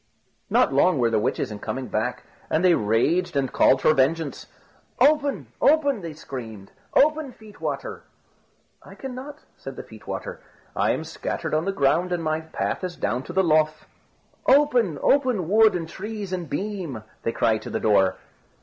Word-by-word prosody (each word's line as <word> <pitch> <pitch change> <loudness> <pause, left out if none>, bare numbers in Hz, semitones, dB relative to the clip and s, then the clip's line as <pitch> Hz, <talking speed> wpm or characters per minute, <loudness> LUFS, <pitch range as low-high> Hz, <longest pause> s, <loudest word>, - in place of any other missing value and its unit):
Not - - +3
long 150 +4 +4
were 120 -2 +2
the 110 - +2
witches 105 - -1
in 105 - -7
coming 130 +5 -4
back, 120 +4 -2 0.3
and 160 +4 +1
they 180 - +6
raged 155 - +1
and 135 -2 0
called 135 - +4
for 155 - +5
vengeance. 145 +2 0 0.5
"Open! 290 -2 +3 0.2
open!" 285 -6 +3
they 165 -2 -6
screamed; 115 -9 -8 0.2
"open, 305 -1 +3
feet 215 -2 -16
water!" - - -4 0.8
"I - - -14
cannot," 270 +3 -8 0.2
said - - -8
the - - -7
feet - - -15
water; - - -5 0.3
"I - - +1
am - - 0
scattered - - -4
on 155 +2 +1
the 195 - 0
ground, 170 +2 +1
and 175 -2 -1
my 155 0 0
path 160 +3 -3
is 180 -1 -4
down 125 - -1
to 175 - -7
the 190 +1 +3
Lough." 155 -2 +4 0.8
"Open, 250 - +4
open, 255 - +2
wood 215 +1 +5
and 165 -2 -3
trees 205 +2 -6
and 175 -5 -4
beam!" 175 - -4 0.2
they 115 - -1
cried 110 -1 +1
to - - -8
the - - -2
door. 95 -3 +3
170 Hz, 175 wpm, -24 LUFS, 135-220 Hz, 0.8 s, they